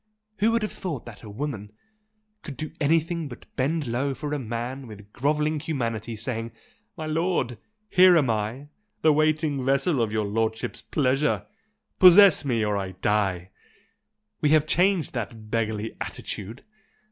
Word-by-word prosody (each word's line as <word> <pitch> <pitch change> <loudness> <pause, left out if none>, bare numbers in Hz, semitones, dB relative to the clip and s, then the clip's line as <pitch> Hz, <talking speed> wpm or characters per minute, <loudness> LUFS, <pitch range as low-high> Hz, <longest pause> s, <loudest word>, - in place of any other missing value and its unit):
'Who 215 +3 +4
would 230 -1 +1
have 210 - -2
thought 160 -10 -5
that 115 -3 -11
a 110 - -10
woman' 105 -3 -5 0.7
could 145 - -9
do 155 -1 -5
anything 165 +2 +1
but 125 -3 -11
bend 150 +4 0
low 125 +4 -1
before 145 +2 -4
a 150 - -1
man 120 +2 -5
with 105 -1 -13
grovelling 150 +3 0
humility 115 -7 -3
saying 115 +1 -4 0.4
'My 160 - -5
lord, 155 - -1 0.3
here 185 -3 +6
am 145 -5 +3
I, 115 +6 -2 0.3
the 155 - +6
waiting 155 -2 +1
vessel 135 +2 +2
of 110 -2 0
your 110 -1 0
lordship's 110 +2 -2
pleasure! 135 +1 0 0.5
possess 185 0 +8
me 120 -6 0
or 105 -1 0
I 95 -1 -4
die!' 95 -2 -1 0.9
We 150 - +3
have 155 0 +4
changed 180 +1 +2
that 110 -3 -6
beggarly 110 -1 -2
attitude!" 110 +6 -6
130 Hz, 150 wpm, -25 LUFS, 110-155 Hz, 0.9 s, possess